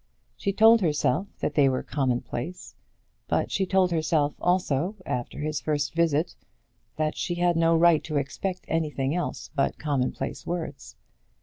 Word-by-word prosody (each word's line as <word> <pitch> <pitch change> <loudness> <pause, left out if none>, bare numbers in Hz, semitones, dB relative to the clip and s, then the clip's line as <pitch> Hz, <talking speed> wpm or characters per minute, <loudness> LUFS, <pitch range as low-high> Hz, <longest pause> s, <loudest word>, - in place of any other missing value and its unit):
She 200 - -1
told 220 +3 +6
herself 155 +2 +1
that - - -1
they 145 -2 +4
were 130 - -1
commonplace; 130 +4 -3 0.5
but - - 0
she 190 -1 0
told 185 -1 +3
herself, 155 -3 +1
also, 180 0 +1
after 120 -1 -3
his 155 0 -2
first 145 -2 -1
visit, 165 -1 +1 0.6
that 155 0 -1
she 175 - -2
had 175 0 +2
no 165 0 +4
right 170 -1 +5
to 155 -2 -2
expect 180 +7 -3
anything 150 -4 -1
else 175 0 -3
but 140 -2 0
commonplace 140 -4 -2
words. 165 - -5
155 Hz, 145 wpm, -26 LUFS, 145-175 Hz, 0.6 s, told